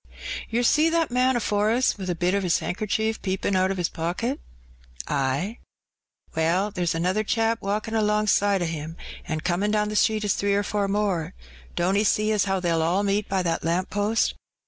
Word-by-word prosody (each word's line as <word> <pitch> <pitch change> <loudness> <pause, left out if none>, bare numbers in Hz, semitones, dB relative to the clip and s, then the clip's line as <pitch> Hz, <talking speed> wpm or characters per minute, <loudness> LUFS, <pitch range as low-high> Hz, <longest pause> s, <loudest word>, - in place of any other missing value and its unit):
"Ter 235 +2 +1
see 305 +6 +4
that 330 -4 +1
man 255 +1 +2
afore 210 -2 +1
us. 245 +3 +2
with 190 -3 -6
a 175 - 0
bit 175 +2 0
o* 200 - +1
his 180 -3 +2
hankercher 220 +3 -1
)eepin* 190 0 -1
out 185 0 +3
o* 195 - -1
his 175 -2 0
pocket? 180 - -3 0.4
" - - -12
Ay." 140 - -1 0.8
Well, 175 +6 +1
there's 175 -4 -1
another 185 +6 0
chap 225 +1 0
walkin* 210 +3 -2
alongside 210 -3 +2
o* - - 0
him, 165 0 -5 0.3
VD^ 155 0 -2
comin* 180 +4 0
down 210 0 +1
the 210 - -4
street 215 0 +2
is 205 - +2
three 200 0 0
or 205 - +1
four 205 -1 -1
more; 195 -4 -1 0.4
don't 180 +3 +1
'e 205 - +3
jee 215 +1 +2
as 210 -3 +2
how 195 -1 0
they'll 170 -2 +1
all 175 +5 +1
meet 200 +1 0
by 190 -1 0
that 170 -2 -1
lamp 175 +3 -1
post? 205 +2 +1
200 Hz, 200 wpm, -25 LUFS, 175-215 Hz, 0.8 s, see